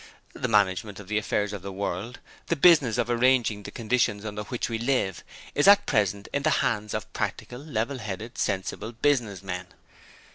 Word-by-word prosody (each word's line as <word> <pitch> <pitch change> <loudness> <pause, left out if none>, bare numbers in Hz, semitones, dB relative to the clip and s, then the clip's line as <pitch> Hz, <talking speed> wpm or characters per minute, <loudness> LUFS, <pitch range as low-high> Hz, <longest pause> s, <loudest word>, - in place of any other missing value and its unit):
The 125 - -3
management 105 -2 +1
of 105 -1 -11
the 105 0 +1
affairs 105 -1 -1
of 100 - -5
the 100 +1 -6
world 100 +4 -4 0.3
the 170 - +1
business 145 -8 +5
of 120 -2 +1
arranging 120 -3 +2
the - - -8
conditions 110 -3 0
under 105 -1 -4
which 120 +3 -3
we 115 -1 -3
live 115 -7 0 0.3
is 145 - +2
at 205 0 +7
present 100 -1 0
in 140 - +1
the 155 - +2 0.2
hands 105 -2 -1
of - - -5
Practical, 125 - -4
Level 135 -2 -3
headed, 110 +2 -6
Sensible 100 +3 -2
Business 120 -6 0
men. 90 -1 -5
110 Hz, 180 wpm, -26 LUFS, 100-125 Hz, 0.3 s, at